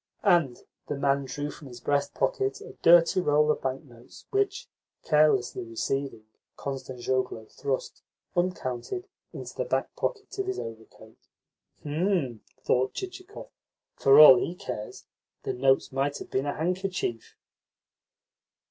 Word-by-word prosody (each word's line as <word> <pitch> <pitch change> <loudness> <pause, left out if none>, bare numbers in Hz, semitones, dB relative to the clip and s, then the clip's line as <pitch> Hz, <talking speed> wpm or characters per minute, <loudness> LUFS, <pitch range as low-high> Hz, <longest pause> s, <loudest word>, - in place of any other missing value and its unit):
And 155 -9 +3 0.3
the 145 - -2
man 140 0 +1
drew 145 +2 -4
from 145 - -12
his 120 -2 -10
breast 145 +3 0
pocket 405 -6 0
a 430 +1 -11
dirty 175 +2 +6
roll 150 -2 +3
of - - -2
bank 130 +3 -3
notes, 120 -4 -16
which, 400 0 0 0.4
carelessly 150 -7 +3
receiving, 115 +1 -3 0.3
Kostanzhoglo 130 -3 -3
thrust, 135 -1 -3 0.3
uncounted, 175 - -2 0.2
into - - -8
the - - -1
back - - -2
pocket 405 -3 -4
of 390 - -1
his 385 - -2
overcoat. 115 -1 -10 0.6
"Hm!" 150 - -1 0.2
thought 130 +1 +1
Chichikov. 380 +5 -8 0.5
"For 135 +1 +6
all 135 -5 +11
he 170 - -3
cares, 105 -10 -7 0.4
the - - -2
notes 135 +1 +2
might 135 +2 -1
have - - -10
been 135 +2 0
a 145 - -2
handkerchief." 180 - -2
145 Hz, 130 wpm, -27 LUFS, 130-180 Hz, 0.6 s, all